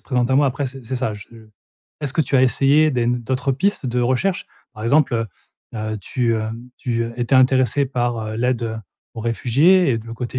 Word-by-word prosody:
présente 125 -1 -1
à - - +3
moi?» 145 0 +4
après 135 +1 -2
c'est 130 -1 -9
c'est 130 +1 -3
ça, 125 -4 -1
je 100 - -11 0.7
Est-ce 145 -3 -2
que 160 - +2
tu 135 - -4
as 130 - +4
essayé 140 +4 +4
des 120 -2 0
d'autres 125 +3 -1
pistes 195 +5 0
de 125 0 -1
recherche? 130 +10 0 0.3
Par 110 +1 -7
exemple, 140 +2 +3
heu 115 0 0 0.5
heu, 110 0 -3
tu, 115 +4 -1
heu, 110 0 -3 0.3
tu, 115 -3 -1
heu, 115 - -6
étais 120 +3 0
intéressée 130 +1 +3
par 120 -4 -2
l'aide 115 -2 -1 0.3
aux 115 - -6
réfugiés 140 +9 +3
et 115 - +1
de 115 - -11
le 115 - -7
côté 125 +1 -4
125 Hz, 210 wpm, -20 LUFS, 115-135 Hz, 0.7 s, moi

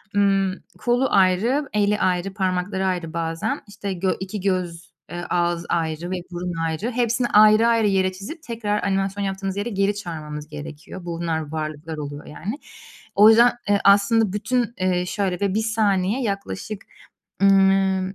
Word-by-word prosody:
Imm, 195 -1 +3 0.3
kolu 245 +2 +2
ayrı, 205 +10 +2
eli 210 0 +2
ayrı, 185 +1 0
parmakları 190 0 -1
ayrı 175 -3 -2
bazen, 165 -1 -2
işte, 200 -1 -5
gö 185 +1 0
2 190 +2 -5
göz, 180 -3 -2 0.2
eee, 175 0 -5
ağız 175 -1 0
ayrı 165 +1 -2
ve - - 0 0.2
burun 175 0 -4
ayrı, 165 +9 -2
hepsini 240 0 +1
ayrı 215 +2 +6
ayrı 230 -2 +3
yere 190 -1 +2
çizip 210 - -9
tekrar 215 -3 -2
animasyon 195 +1 -1
yaptığımız 195 0 -3
yere 210 +4 -2
geri 200 0 0
çağırmamız 155 -6 -6
gerekiyor. 155 +4 -9
Bunlar 165 -3 -3
varlıklar 155 0 -5
oluyor 145 0 -6
yani. 205 - -6 0.6
O 210 +2 +8
yüzden, 235 +2 +6 0.2
eee, 205 - +4
aslında 200 +1 +4
bütün, 235 +2 -1
eee, 180 -1 0
şöyle 185 -2 -2
ve 200 -2 +1
1 220 +2 0
saniye 215 +1 +1
yaklaşık, 200 - -4 0.6
ımm, 195 -1 +3
195 Hz, 150 wpm, -22 LUFS, 175-210 Hz, 0.6 s, O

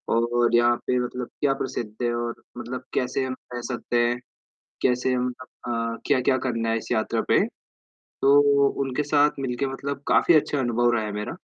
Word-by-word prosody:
और 120 +1 +2
यहाँ 120 0 +4
पे 125 0 +2
मतलब 125 0 -3
क्या 140 -2 +3
प्रसिद्ध 120 -5 -4
है 120 0 +1
और 120 0 -3 0.2
मतलब 120 +1 -5
कैसे 125 +1 0
हम 130 0 -4 0.2
रह 120 - -4
सकते 120 0 -2
हैं, 120 +1 -1 0.6
कैसे 125 0 +2
हम 125 0 0
अ 130 - -8 0.3
अ, 115 0 -1
क्या-क्या 130 -2 +3
करना 115 -2 -1
है 115 - +1
इस 110 - -9
यात्रा 110 -2 0
पे? - - +4 0.8
तो 140 +1 +7 0.4
उनके 135 +2 -1
साथ 145 0 +3
मिलके 135 0 -2
मतलब 140 +1 -5
काफ़ी 175 - +4
अच्छा 150 -1 +2
अनुभव 120 -1 +2
रहा 115 -2 +1
है 105 - -4
मेरा। 105 +1 -4
125 Hz, 185 wpm, -25 LUFS, 120-135 Hz, 0.8 s, तो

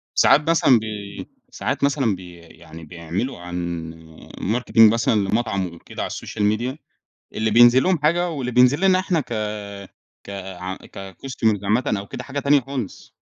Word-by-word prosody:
ساعات 150 +3 +4
مثلًا 135 -7 +5
بي 105 -2 -7 0.2
ساعات - - -3
مثلًا 135 -7 +1
بي 90 -1 -11
يعني 80 -1 -14
بيعملوا 85 - -5
عن 85 -2 -5 0.5
marketing 115 0 +4
مثلًا 115 0 +1
لمطعم 100 -1 0
وكده 85 - -7
على - - -4
الsocial 105 - -6 0.2
media، 125 +5 -4 0.6
اللي 110 0 -1
بينزل 120 +3 +6
لهم 185 -3 +2
حاجة، 170 +4 +1
واللي 130 -5 -4
بينزل 125 +6 +4
لنا 190 -1 +4
احنا 180 -3 0
ك 110 -6 -3 0.8
ك - - -7 0.5
كcustomer 110 +2 -3
عامةً 105 0 +1
أو 100 - -9
كده 125 - -7
حاجة 140 +2 -4
تانية 140 0 +3
خالص. 130 -6 -7
115 Hz, 150 wpm, -22 LUFS, 100-135 Hz, 0.8 s, بينزل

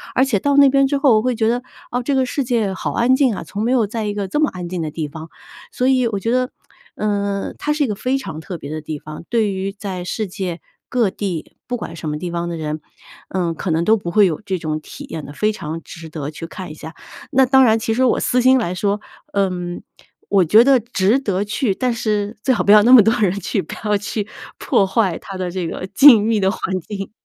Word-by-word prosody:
而 260 - +4
且 235 -8 +1
到 285 +4 +1
那 280 -1 +8
边 275 0 +3
之 285 0 0
后， 275 -5 +4
我 - - +2
会 250 0 0
觉 220 -1 +1
得， 245 +1 0 0.3
哦， 245 +1 -1
这 275 +2 -1
个 260 -1 +2
世 275 +2 -2
界 225 -6 0
好 - - -3
安 245 +2 +3
静 260 -6 +2
啊， - - -6
从 205 - -6
没 240 - +1
有 235 -4 +3
在 220 +1 -4
一 205 - -2
个 205 -1 -3
这 295 - -1
么 305 - +3
安 180 -2 -6
静 180 -2 -3
的 155 - -2
地 160 -1 -3
方。 160 +2 -9 0.4
所 250 - -1
以 255 -2 +3
我 205 -3 -2
觉 225 - -2
得， 255 0 +1 0.4
呃， 200 -1 -2
它 300 - -1
是 300 -1 0
一 - - +1
个 210 - -2
非 255 +6 -1
常 160 - -6
特 175 +2 -7
别 140 - -9
的 155 0 -4
地 155 -1 -6
方， 155 +2 -9
对 220 -4 +1
于 190 +1 -3
在 195 -3 -5
世 210 +3 -3
界 180 -2 -4 0.3
各 235 -6 +2
地， 185 -5 -5
不 245 - -2
管 170 - -7
什 160 - -6
么 150 - -2
地 175 - -4
方 170 0 -2
的 170 - -4
人， 155 0 -4 0.5
嗯， 175 -3 -1
可 175 - -3
能 165 +1 +1
都 220 +1 +4
不 170 -3 -5
会 210 0 +5
有 160 - -2
这 190 -1 -1
种 155 -2 -3
体 - - -10
验 155 -2 -7
的， 145 - -9
非 215 +5 +1
常 165 -5 -6
值 165 -1 -10
得 150 -3 -5
去 165 - -8
看 185 -2 -8
一 - - -7
下。 160 +2 -9 0.4
那 265 -1 +5
当 265 +1 +5
然 225 -2 +4
其 220 0 -1
实 260 - +2
我 - - +2
私 250 0 +1
心 260 +1 +5
来 180 -6 -2
说， 205 +2 0 0.3
嗯， 180 -3 -1 0.5
我 195 -3 +4
觉 215 +8 +6
得 265 -1 +5
值 225 +1 +1
得 200 -6 -1
去， 210 0 -1
但 250 +4 -1
是 215 -1 -2
最 260 - +3
好 - - 0
不 200 - +4
要 210 -1 +8
那 245 - +4
么 240 - +10
多 225 - +3
人 195 -4 +3
去， 190 +1 -1
不 - - -9
要 210 -1 +3
去 210 0 -4 0.3
破 195 - +2
坏 190 -3 +1
它 195 - -9
的 180 -1 -3
这 180 -2 -3
个 185 - -5
静 225 +1 +7
谧 225 -2 +2
的 190 0 +2
环 185 -3 -3
境。 195 +2 -6
205 Hz, 280 characters per minute, -19 LUFS, 180-240 Hz, 0.5 s, 么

